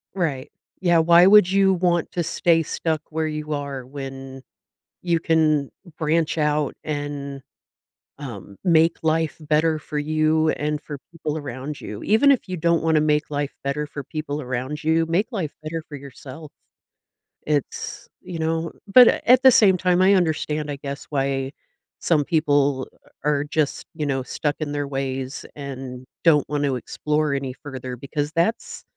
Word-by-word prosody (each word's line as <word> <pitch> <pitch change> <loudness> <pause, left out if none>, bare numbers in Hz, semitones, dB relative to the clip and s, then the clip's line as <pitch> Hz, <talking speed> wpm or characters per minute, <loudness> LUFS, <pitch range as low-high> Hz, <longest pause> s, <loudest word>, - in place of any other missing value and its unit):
Right. 150 -8 -2 0.3
Yeah, 175 -3 +3
why 170 +2 +6
would 200 -2 +7
you 195 -1 +4
want 175 -2 +1
to 175 - 0
stay 165 0 +2
stuck 160 0 -2
where 160 0 -1
you 155 0 -5
are 140 -3 -4
when 135 0 -8 0.6
you 170 -2 +1
can 155 -4 +2 0.3
branch 160 0 +1
out 150 -1 +1
and, 145 -2 -4 0.8
um, 105 -8 -9
make 165 -1 +4
life 160 0 +1
better 155 +1 +1
for 150 0 -5
you 155 +1 +2
and 150 0 -2
for 145 -2 -7
people 155 -2 -4
around 135 +1 -6
you? 105 0 -7
Even 270 +7 +5
if 250 -7 -1
you 185 - -3
don't 170 0 +1
wanna 160 -1 +3
make 150 0 +1
life 145 -1 -2
better 145 +2 -2
for 140 0 -7
people 150 +1 -5
around 130 +4 -4
you, 160 +1 +2
make 175 +8 0
life 185 - -3
better 160 +1 -4
for 150 - -10
yourself. 140 +2 -11 1.0
It's, 150 -3 -3
you 175 -3 -7
know 160 +1 -1 0.2
but 250 -2 +10 0.2
at 250 +1 +6
the 260 - +9
same 195 -6 +5
time, 180 0 +2
I 190 +2 +6
understand, 155 -4 0
I - - -3
guess, 140 0 -6
why 135 -2 -1 0.5
some 150 -4 +2
people 145 -4 +1 0.4
are 145 -1 +1
just, 150 -1 -1
you 155 -2 -3
know, 135 -2 -1
stuck 145 +2 -2
in 155 -2 -3
their 145 -1 -2
ways 135 -1 -4
and 130 -3 -7 0.2
don't 150 -4 +4
want 145 -1 -1
to 135 -2 0
explore 150 +4 -1
any 135 -2 -3
further 130 -2 -7
because 145 +4 -4
that's 225 - -1
150 Hz, 160 wpm, -23 LUFS, 140-165 Hz, 1.0 s, but